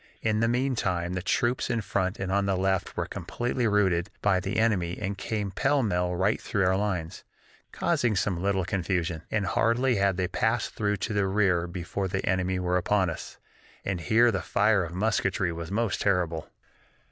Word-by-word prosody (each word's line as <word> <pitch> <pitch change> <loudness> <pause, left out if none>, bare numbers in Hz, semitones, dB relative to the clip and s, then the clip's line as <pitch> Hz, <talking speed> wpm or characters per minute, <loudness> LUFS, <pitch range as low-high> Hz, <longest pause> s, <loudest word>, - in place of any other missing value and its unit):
In 110 -1 +1
the 115 - +2
meantime 115 -9 0
the 95 - -2
troops 120 +7 0
in 115 -2 0
front 95 -1 -1
and 95 -1 -2
on 100 0 +1
the 95 -1 +1
left 95 0 -1
were - - 0
completely 120 0 -2
routed 95 -3 +2
by 95 -2 +3
the 95 - -3
enemy 95 -6 +1
and 100 -1 -2
came 100 0 -3
pell 135 +6 +1
mell 90 -4 0
right 95 +4 +1
through 100 -4 0
our 95 +1 +3
lines, 95 -5 -2 0.5
causing 120 -3 +1
some 95 -2 0
little 95 -2 +1
confusion, 90 -4 -1
and 105 -2 0
hardly 115 +6 +2
had 100 -2 +2
they 90 -1 0
passed 110 +6 0
through 105 -1 0
to 105 +3 -3
the 100 -1 +1
rear 95 -4 +2
before 90 +2 -3
the 95 +1 -2
enemy 95 0 0
were 90 0 +1
upon 95 -1 +1
us, - - -8 0.5
and 95 -3 -2
here 115 +6 +4
the 95 -5 -1
fire 100 +3 +2
of 85 - -6
musketry 95 -3 0
was 85 0 -6
most 110 0 -1
terrible. 85 -5 0
95 Hz, 185 wpm, -27 LUFS, 90-110 Hz, 0.5 s, here